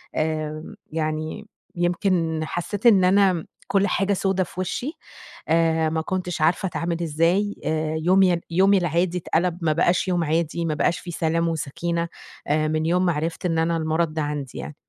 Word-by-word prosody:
آمم، 155 0 -3 0.2
يعني 155 +5 -3 0.3
يمكن 175 -2 0
حسّيت 200 +7 -4
إن 200 -6 +7
أنا 185 -3 +3 0.2
كل 195 +1 +2
حاجة 195 +2 +1
سودا 190 -1 +1
في 180 - -10
وِشّي، 245 - -2 0.6
آآ 160 0 +2
ما 160 0 -1
كنتش 180 -2 -3
عارفة 170 +4 +2
أتعامل 170 -1 -2
إزاي، 170 +6 +1
آآ 155 0 -1
يومي 180 +3 +4
ي 170 - -1
يومي 195 +3 +4
العادي 175 +1 0
اتقَلَب 175 0 0
ما 155 -2 +2
بقاش 175 +3 +2
يوم 175 -2 +1
عادي، 165 +2 -1
ما 155 - 0
بقاش 170 - +1
في 175 - -8
سلام 165 +1 0
وسَكينة، 170 +2 -2 0.4
آآ 155 +1 +1
من 155 0 0
يوم 180 +2 +2
ما 175 - +2
عرِفْت 165 +4 -3
إن 165 -2 +1
أنا 165 0 +1
المرض 160 0 0
ده 155 - -1
عندي 145 -3 -4
يعني. 150 - -7
170 Hz, 175 wpm, -23 LUFS, 160-180 Hz, 0.6 s, إن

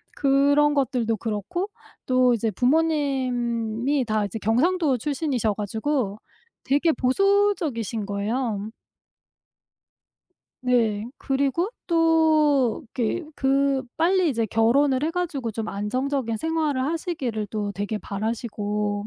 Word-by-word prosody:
그런 285 +2 +3
것들도 245 -5 0
그렇고 235 - -3 0.4
또 255 -1 +3
이제 225 -1 0
부모님이 255 - 0
다 215 -1 0
이제 200 +2 -5
경상도 280 - +2
출신이셔 260 -5 -1
가지고 220 +1 -2 0.5
되게 290 +5 +2
보수적이신 300 - +1
거예요. 210 +1 -2 2.0
네. 225 -4 +2
그리고 280 - 0 0.2
또 315 -6 +3
이렇게 255 +8 -1
그 275 0 +1
빨리 360 +2 +3
이제 230 -5 0
결혼을 255 +5 +2
해 320 - +1
가지고 320 -9 -2
좀 220 0 -4
안정적인 230 +4 -2
생활을 310 -3 -1
하시기를 275 - -3
또 205 -2 -3
되게 205 +2 -3
바라시고 210 -1 -3
255 Hz, 240 characters per minute, -24 LUFS, 220-295 Hz, 2.0 s, 그런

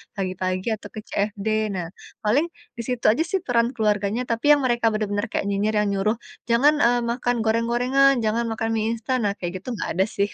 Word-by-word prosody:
pagi-pagi 185 -1 -2
atau 210 -1 -11
ke - - -4
CFD. 205 +1 -2 0.3
Nah, 175 -2 -3 0.4
paling 260 +10 +3 0.3
di 235 - -3
situ 250 -2 -3
aja 255 - 0
sih, 385 - +2
peran 235 -2 +2
keluarganya. 210 +1 0
Tapi 230 +4 -2
yang 285 - -1
mereka 240 -2 +1
benar-benar 205 +1 -1
kayak - - -1
nyinyir 205 +2 0
yang - - 0
nyuruh, 205 +3 0 0.3
"Jangan, 275 +6 +5
eee, 240 0 +3
makan 245 0 0
goreng-gorengan, 245 +5 +3
jangan 230 +2 +1
makan 225 0 -2
mi 220 - 0
instan," 245 +3 -1
nah, 200 - 0
kayak 180 +1 -4
gitu - - -22
nggak - - -4
ada, 190 +1 +3
sih. 200 -1 -1
220 Hz, 195 wpm, -23 LUFS, 200-240 Hz, 0.4 s, Jangan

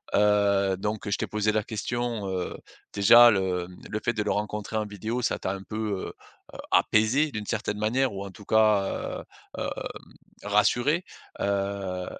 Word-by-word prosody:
heu, 100 -2 +3
donc 105 +2 -3
je 100 - +1
t'ai - - -3
posé 105 0 0
la 110 0 +1
question, 115 0 -3
heu, 95 -1 -3 0.3
déjà 120 +4 +8
le, 95 -3 0
mmh, 90 - -15
le 110 - -2
fait - - +2
de 110 - -2
le - - -1
rencontrer 105 +1 -3
en 110 -1 0
vidéo, 110 +4 -4
ça - - -1
t'a 95 - -2
un 95 0 -7
peu, 105 - -7 0.3
heu - - -11 0.4
heu, - - -9
apaisé, 125 +8 +3
d'une 105 -3 -5
certaine 105 -1 -2
manière 120 +5 +1
ou 100 0 -5
en 100 - -8
tout 105 - -14
cas, 110 -2 +4 0.4
heu, - - -9 0.4
hem, - - -2 0.8
rassuré? 120 - +2 0.3
Heu, 100 -2 -2
105 Hz, 175 wpm, -26 LUFS, 100-110 Hz, 0.8 s, déjà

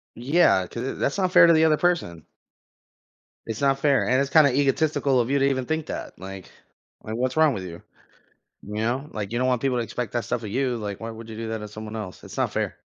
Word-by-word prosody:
Yeah, 130 - +3
'cau 115 - -6
uh 130 +3 -3
that's 140 - -2
unfair 185 -2 +6
to 170 - +6
the 160 0 +4
other 155 -1 +4
person. 160 - -1 1.2
It's 115 0 -5
not 135 -1 +2
fair, 140 -2 +2
and 130 +1 +3
it's 140 0 -1
kinda 145 -3 +5
egotistical 140 0 +2
of 120 - 0
you 140 - +2
to 135 - +4
even 130 -2 -1
think 160 +1 -2
that. - - -6
Like, 95 +1 -9 0.5
like, 110 +1 -5
what's 130 +3 -1
wrong 155 -3 +4
with 95 -4 -5
you? 85 -2 -9 0.8
You 105 - -8
know? 120 +7 -1
Like, 105 -2 -4
you 120 - -1
don't 130 - +1
want 125 -2 +1
people 130 -2 +1
to 120 - -1
expect 115 0 -5
that 120 -2 -1
stuff 115 - -2
of 110 - -5
you, 130 +1 0
like, 105 -3 -5
why 115 0 -5
would 115 0 -10
you 110 - -8
do 115 0 -5
that 110 - -2
to 105 0 -7
someone 110 +1 -8
else? 105 -5 -7
It's - - -10
not - - 0
fair. - - -2
125 Hz, 245 wpm, -24 LUFS, 110-140 Hz, 1.2 s, unfair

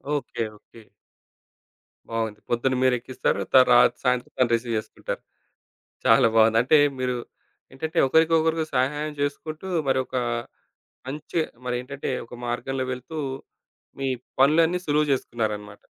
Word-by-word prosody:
Okay. 140 -4 -3
Okay. 115 - -17 1.3
బావుంది. 115 -2 -2
పొద్దున 125 +2 +1
మీరు 130 -1 +4
ఎక్కిస్తారు 130 +2 -1
త - - +3 0.2
రాత్రి 120 0 +5
సాయంత్రం 125 -1 0
తను 125 -2 +3
రిసీవ్ 115 0 -2
చేసుకుంటారు. 110 0 -5 0.8
చాలా - - +6
బావుంది. 110 0 +5
అంటే 150 +5 +5 0.2
మీరు 125 -1 -1 0.6
ఏంటంటే, 160 +5 -4
ఒకరికొకరు 160 +2 +3
సహాయం 150 +4 0
చేసుకుంటూ, 155 +4 -3 0.2
మరొకా 130 -1 0 0.9
మంచే 150 +4 -2 0.2
మరి 125 -1 -1
ఏంటంటే 140 +2 -6 0.2
ఒక 120 - -11
మార్గంలో 130 +2 -2
వెళ్తూ, 125 +6 -8 0.8
మీ 135 - -1 0.3
పనులన్నీ 160 +6 +4
సులువు 150 0 +2
చేసుకున్నారనమాట. 105 -5 -3
130 Hz, 115 wpm, -25 LUFS, 120-150 Hz, 1.3 s, చాలా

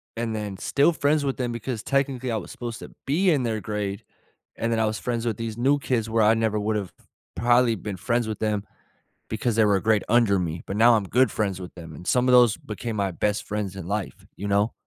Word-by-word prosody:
and 115 -1 -2
then 105 -3 -4
still 145 - +3
friends 145 0 +1
with 135 -1 -1
them 125 -2 -2
because 120 -1 -4
technically 135 -3 0
I 110 - 0
was 95 - -7
supposed 120 -2 -6
to - - -10
be 175 +8 +2
in 140 -6 +2
their 110 -2 -1
grade, 100 -1 -3 0.5
and 115 - -2
then 115 - +1
I 110 - +3
was 110 0 -2
friends 120 -1 -2
with 110 -3 -1
these 115 -1 -4
new 140 +4 +3
kids 120 -7 -1
where 110 -1 +2
I 110 - +6
never 110 -2 0
would've 105 -2 -2 0.4
probably 120 -1 +3
been 100 -1 -6
friends 120 +3 0
with 110 - -4
them 105 -2 0 0.7
because 110 +1 -1
they 110 - +5
were 105 -1 +4
a 95 - -2
grade 110 -2 +2
under 115 -4 +4
me, 85 -2 -3
but 95 - -4
now 115 +2 +6
I'm 105 -3 +1
good 125 +7 +3
friends 100 -3 -2
with 90 - -9
them, 80 -3 -10
and 90 +5 -11
some 125 0 +2
of 125 - +4
those 120 -3 +6
became 110 +1 -6
my 100 -2 0
best 105 +4 -1
friends 100 -2 -4
in 95 -3 -7
life, 100 0 -4
you 100 - -4
know? 100 +3 +2
110 Hz, 240 wpm, -25 LUFS, 105-120 Hz, 0.7 s, I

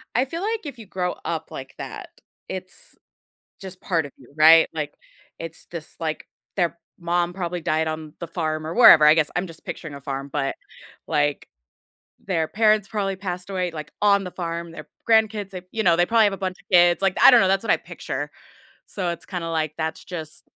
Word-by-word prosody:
I 250 +3 +3
feel 330 +6 -5
like 440 -1 -2
if 280 -4 -7
you 225 - -11
grow 180 -2 -2
up 160 -1 -3
like 135 0 -8
that, - - -7 0.4
it's 185 0 -7 0.7
just 185 -1 -8
part 165 -5 0
of 140 - -13
you, 130 0 -19
right, 160 +1 +7
like, 150 -2 -3 0.5
it's 165 -1 -8
just, 165 -1 -9
like, 160 -1 -3 0.3
their 170 -3 0 0.2
mom 175 0 0
probably 180 -1 -3
died 160 0 0
on 155 -1 -6
the 170 - -4
farm 155 -2 -3
or 165 - -4
wherever, 170 -10 +9
I 150 - +8
guess 160 -2 +1
I'm 180 - 0
just 165 -2 -12
picturing 150 -3 -7
a 140 - -9
farm, 140 0 -5
but 135 -2 -1 0.5
like, 145 -2 0 0.8
their 165 -5 0
parents 215 -1 +3
probably 200 -2 -1
passed 180 -1 -5
away, 185 -2 -1
like 155 -1 -8
on 200 -1 +4
the 180 - -6
farm, 170 -1 -5
their 155 -2 -10 0.2
grandkids, 220 -3 +3
they 185 -2 -7
you 220 - -1
know, 170 - +5
they 175 - +4
probably 225 +1 +4
have 205 - +3
a - - -3
bunch 185 -1 -3
of - - -28
kids, 175 -1 +6
like, 195 -1 +2
I - - +11
don't 245 -2 +7
know, 190 - +3
that's 195 0 +2
what - - -1
I - - +4
picture, - - -6 0.6
so 185 -3 -3
it's 170 - -5
kinda 175 -3 -4
like 155 -2 -1
that's 160 0 -3
just 160 -4 -7
175 Hz, 210 wpm, -23 LUFS, 160-195 Hz, 0.8 s, I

